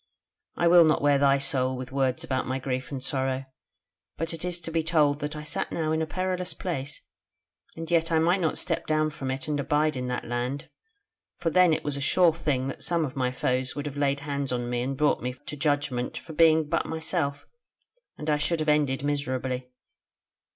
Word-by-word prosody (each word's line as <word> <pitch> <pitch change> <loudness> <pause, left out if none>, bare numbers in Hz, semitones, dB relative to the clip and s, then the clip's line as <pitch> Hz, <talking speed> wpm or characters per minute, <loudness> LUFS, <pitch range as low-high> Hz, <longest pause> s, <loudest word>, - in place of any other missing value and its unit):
I 175 - +2
will 175 0 +8
not 155 -2 +2
wear 145 -1 +4
thy 140 0 +5
soul 130 -2 0
with 130 0 -7
words 135 +2 0
about 130 -5 -1
my 130 +1 -1
grief 130 -1 -3
and 135 -2 -4
sorrow: 130 -1 0 0.7
but 165 +1 -3
it 165 - -6
is 180 -1 -2
to 165 - -7
be 165 0 +1
told 155 -3 +2
that 150 +1 -4
I 150 - -6
sat 150 - -2
now 155 -2 -1
in 160 0 +1
a 160 - -1
perilous 185 +1 -2
place, 140 -6 -4 0.7
and 165 +1 -6
yet 165 0 +2
I 165 - +4
might 175 +4 +3
not 160 - 0
step - - -2
down 155 0 +2
from 135 -2 -5
it 130 +2 -3
and 150 -1 -1
abide 150 +2 +1
in 125 -1 -3
that 125 -1 -3
land, 125 +4 -3 0.7
for 165 - -1
then 180 0 +5
it 155 - 0
was 145 -1 -2
a - - -4
sure 170 +3 +4
thing, 145 -5 -1
that - - -7
some 170 -2 +1
of 135 - -7
my 125 -2 0
foes 125 0 -1
would 145 0 -4
have 145 -2 -5
laid 140 -1 +1
hand 140 -2 -3
on 120 -1 -2
me 120 0 0
and 135 +2 -2
brought 150 +1 +2
me 125 +1 -3
to - - -5
judgment 145 -4 -1
for 160 - -8
being 160 -1 +5
but - - 0
myself, 160 -3 -2 0.7
and 150 - -7
I 150 -1 +2
should 165 +2 0
have 155 0 0
ended 145 -3 +2
miserably. 130 -3 -2
145 Hz, 215 wpm, -27 LUFS, 130-160 Hz, 0.7 s, will